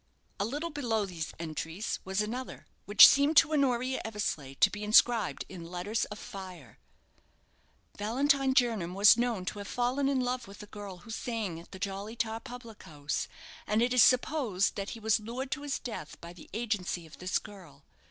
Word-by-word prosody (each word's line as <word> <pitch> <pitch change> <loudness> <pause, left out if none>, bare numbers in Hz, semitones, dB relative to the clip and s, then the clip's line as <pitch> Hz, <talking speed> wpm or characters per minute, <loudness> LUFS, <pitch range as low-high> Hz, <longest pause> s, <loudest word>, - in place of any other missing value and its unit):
_" - - -43 0.4
A 200 - +1
little 295 +9 -3
below 235 -8 -1
these 165 -7 -5
entries 165 +4 -4
was 190 +2 -1
another, 245 +5 -5 0.2
which 205 +1 +10
seemed 285 +2 +3
to 310 - +6
Honoria 260 -3 +1
Eversleigh 180 -11 -3
to - - +4
be 210 0 -6
inscribed 220 0 +3
in 170 -3 -9
letters 185 +5 -2
of 210 - -8
fire: 185 - -10 1.2
"Valentine 265 +5 +2
Jernam 220 - +1
was 205 +2 +8
known 235 -5 -1
to 205 - -4
have 200 - -7
fallen 255 +5 0
in 275 -2 +1
love 250 -1 -2
with 200 +1 -11
a - - -9
girl 205 -3 -9
who 225 - -9
sang 220 -7 -3
at 170 - -15
the 190 - -8
'Jolly 200 +3 -5
Tar' 225 0 -2
public 240 -3 -10
house, 145 -1 -4 0.4
and 210 +1 +2
it 245 +1 +1
is 250 - +6
supposed 255 -7 +3
that 200 0 -4
he - - -10
was 220 0 +2
lured 245 +5 -5
to 300 - -2
his 290 -1 -2
death 215 -11 -7
by 170 +1 -10
the 175 - -14
agency 205 -6 -2
of 160 - -15
this 180 0 0
girl. 175 -9 -11
215 Hz, 190 wpm, -30 LUFS, 185-245 Hz, 1.2 s, which